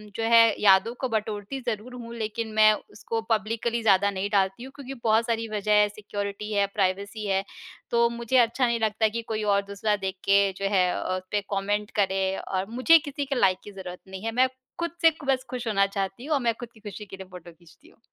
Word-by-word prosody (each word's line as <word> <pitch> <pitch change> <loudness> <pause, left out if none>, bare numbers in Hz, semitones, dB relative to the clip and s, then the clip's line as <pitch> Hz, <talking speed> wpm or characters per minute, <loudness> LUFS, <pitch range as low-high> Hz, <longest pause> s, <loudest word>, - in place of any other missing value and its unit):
जो 225 - -2
है 230 +1 +6 0.2
याद 195 0 +6
को 260 - -1
बटोरती 215 +3 -3
ज़रूर 235 0 -4
हूँ 235 -2 -8
लेकिन 225 0 -3
मैं 215 0 +6 0.2
उसको 225 +2 -4
पब्लिकली 230 +2 0
ज़्यादा 200 -1 +4
नहीं 195 +1 -3
डालती 195 +2 +1
हूँ। 265 - -9
क्योंकि 270 -2 -8
बहुत 225 +1 +3
सारी 230 -1 -1
वजह 210 0 -2
है 210 - +4
सिक्योरिटी 205 0 -5
है, 200 -1 +3
प्राइवेसी 200 +2 -2
है। 195 0 +1 0.5
तो 235 0 +4
मुझे 235 +2 -1
अच्छा 240 +1 +3
नहीं 235 -1 0
लगता 220 0 +2
कि 230 +2 -3
कोई 215 -1 -2
और 200 -1 +3
दूसरा 200 +1 -1
देख 190 -1 -4
के 200 0 +5 0.2
जो 195 - -3
है 180 -1 +4
अ, 185 - -2
उस 185 - -7
पे 205 - +1
कमेंट 205 +1 -1
करे 195 -1 +2 0.2
और 190 +1 -2
मुझे 255 +8 +5
किसी 285 -1 -5
के 275 0 -2
लाइक 185 -2 +4
की 205 - -10
ज़रूरत 185 -2 -8
नहीं 190 +1 -8
है। 225 - -1
मैं 255 +3 +3 0.3
खुद 340 0 -1
से 330 -1 +7 0.2
बस 265 -1 +2
खुश 250 -2 -5
होना 195 -3 +3
चाहती 195 +4 -4
हूँ 310 - -1
और 275 - 0
मैं 235 -1 +1
खुद 240 - -7
की 220 - -18
खुशी 210 0 -8
के 195 - -10
लिए 190 -1 -9
फोटो 175 -1 -11
खींचती 170 0 -21
हूँ। - - -25
215 Hz, 230 wpm, -26 LUFS, 195-235 Hz, 0.5 s, से